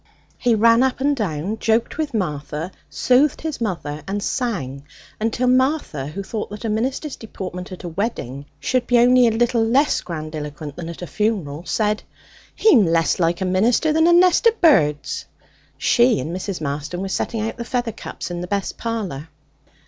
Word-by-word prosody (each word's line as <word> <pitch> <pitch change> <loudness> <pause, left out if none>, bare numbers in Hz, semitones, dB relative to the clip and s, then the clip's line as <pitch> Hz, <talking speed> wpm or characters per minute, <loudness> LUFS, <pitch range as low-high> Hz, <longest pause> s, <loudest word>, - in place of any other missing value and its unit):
He 240 -2 +3
ran 230 +2 +5
up 260 0 +1
and 285 +2 +2
down, 200 - -3
joked 230 +6 0
with 305 -2 -1
Martha, 155 -4 -3 0.2
soothed 260 +3 +2
his 315 -5 -4
mother, 165 -8 -3
and 200 +1 -2
sang 160 - -2 0.4
until 225 +3 0
Martha, 255 - +1
who 195 +7 -5
thought 210 +2 -4
that 210 +3 -7
a - - 0
minister's 260 +7 -2
deportment 185 -4 -7
at 185 - -8
a - - -4
wedding 160 - -4
should 250 - 0
be 245 - +4
only 245 +1 +6
a - - +3
little 230 +1 +2
less 265 +6 +2
grandiloquent 155 -3 -6
than 165 -1 -6
at 170 +1 -8
a - - -3
funeral, 175 -7 -2
said: 210 -1 0 0.5
'He'm 305 - +5
less 165 -2 +2
like 170 +1 +1
a - - +1
minister 225 +12 +2
than 320 +1 +4
a - - +6
nest 360 +5 +5
of 460 0 +2
birds.' 155 - +3 0.5
She 240 -2 +3
and 165 +3 -4
Mrs. 185 -2 -4
Marston 150 +5 -3
were - - -3
setting 220 +3 -2
out 225 +2 -3
the 235 - -4
feather 240 0 -2
cups 205 - -7
in 175 0 -4
the 180 - -5
best 200 0 -3
parlour. 195 -11 -4
210 Hz, 180 wpm, -21 LUFS, 165-245 Hz, 0.5 s, only